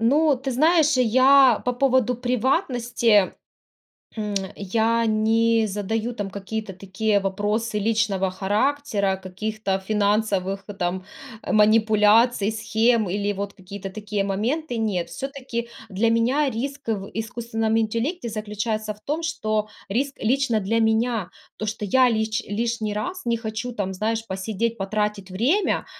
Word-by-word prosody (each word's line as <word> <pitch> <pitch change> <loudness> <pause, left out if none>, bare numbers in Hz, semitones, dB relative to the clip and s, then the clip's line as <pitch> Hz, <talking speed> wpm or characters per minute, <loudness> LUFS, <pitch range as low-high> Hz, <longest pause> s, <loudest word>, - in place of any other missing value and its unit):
Ну, 285 +5 +3
ты 265 +2 -4
знаешь, 310 +1 +4
я 255 +1 +5
по 250 - +1
поводу 255 -1 +2
приватности, 245 - +1 0.9
м, 210 -1 -3 0.2
я 225 +4 +1
не 225 +1 +2
задаю 215 +4 -2
там 205 -3 -4
какие-то 200 +1 -5
такие 200 +3 0
вопросы 210 +3 -1
личного 205 -3 +1
характера, 205 0 0
каких-то 195 +2 -4
финансовых 200 -1 0 0.2
там 180 +1 -1 0.5
манипуляций, 215 +1 +4
схем 220 -1 +1
или 205 +2 -1
вот 200 0 -5
какие-то 195 +1 -8
такие 210 0 -3
моменты. 235 +8 -2
Нет, 200 -6 -1
всё-таки 265 -4 -5 0.2
для 210 +4 +1
меня 250 +6 +2
риск 270 +3 -5
в 200 -3 -2
искусственном 225 0 -2
интеллекте 230 +7 -1
заключается 215 0 -3
в 210 - -21
том, 310 +4 -2
что 215 -10 -1 0.2
риск 270 +6 -1
лично 240 -1 +2
для 225 +4 0
меня, 220 -2 +1 0.3
то, 215 - -3
что 210 0 -3
я 255 +5 +4
лич 220 +1 -1 0.2
лишний 230 -3 -1
раз 365 - -4
не 235 -1 +1
хочу 225 +2 -4
там, 195 -4 -3
знаешь, 220 +4 -2
посидеть, 220 +4 -2
потратить 205 -1 -2
время, 285 - +1
220 Hz, 130 wpm, -23 LUFS, 205-240 Hz, 0.9 s, я